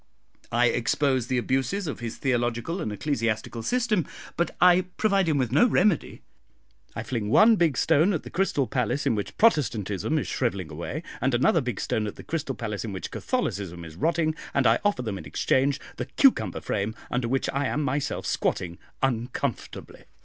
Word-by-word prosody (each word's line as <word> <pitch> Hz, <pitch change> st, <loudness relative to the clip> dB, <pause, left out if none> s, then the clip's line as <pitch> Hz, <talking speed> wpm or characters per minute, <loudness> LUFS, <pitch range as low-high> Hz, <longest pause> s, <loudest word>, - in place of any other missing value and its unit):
I 120 Hz, +1 st, +3 dB
expose 125 Hz, +1 st, +1 dB
the 130 Hz, -, 0 dB
abuses 135 Hz, +11 st, 0 dB
of 150 Hz, -, -4 dB
his 120 Hz, -1 st, -5 dB
theological 120 Hz, +6 st, -1 dB
and 110 Hz, -, -3 dB
ecclesiastical 115 Hz, -2 st, -2 dB
system, 220 Hz, -, 0 dB, 0.3 s
but 170 Hz, -, +1 dB
I 180 Hz, 0 st, +6 dB
provide 195 Hz, -5 st, +2 dB
him 150 Hz, -, +2 dB
with 130 Hz, -4 st, 0 dB
no 245 Hz, -, +5 dB
remedy. 200 Hz, -5 st, +1 dB, 0.7 s
I 110 Hz, -, -3 dB
fling 115 Hz, -2 st, -3 dB
one 220 Hz, -, +6 dB
big 165 Hz, -, +2 dB
stone 160 Hz, +4 st, +4 dB
at 170 Hz, -, -2 dB
the -, -, -10 dB
crystal 170 Hz, -7 st, +1 dB
palace 125 Hz, +3 st, -1 dB
in 135 Hz, -, +3 dB
which 105 Hz, -2 st, -4 dB
Protestantism 125 Hz, -, +2 dB
is 150 Hz, -, -1 dB
shrivelling 100 Hz, -10 st, -2 dB
away, 85 Hz, -, -5 dB, 0.2 s
and 130 Hz, -1 st, +2 dB
another 160 Hz, -, +3 dB
big 125 Hz, -6 st, -4 dB
stone 110 Hz, -1 st, -1 dB
at 105 Hz, -, -6 dB
the -, -, -11 dB
crystal 145 Hz, -5 st, -3 dB
palace 105 Hz, -3 st, -4 dB
in 110 Hz, -3 st, -5 dB
which 95 Hz, -, -6 dB
Catholicism 90 Hz, -3 st, -3 dB
is 80 Hz, -1 st, -11 dB
rotting, 160 Hz, -, +1 dB, 0.2 s
and 140 Hz, -, +3 dB
I 115 Hz, +1 st, +5 dB
offer 205 Hz, -11 st, +1 dB
them 105 Hz, -5 st, -4 dB
in -, -, -10 dB
exchange 135 Hz, +1 st, +1 dB, 0.2 s
the -, -, -3 dB
cucumber 110 Hz, -, +3 dB
frame 105 Hz, +2 st, -2 dB, 0.2 s
under 125 Hz, -1 st, 0 dB
which 135 Hz, +2 st, 0 dB
I 140 Hz, 0 st, 0 dB
am 150 Hz, -, -1 dB
myself 140 Hz, +1 st, -2 dB
squatting 85 Hz, -1 st, -1 dB, 0.2 s
uncomfortably. 125 Hz, -1 st, -3 dB
130 Hz, 180 wpm, -26 LUFS, 110-160 Hz, 0.7 s, I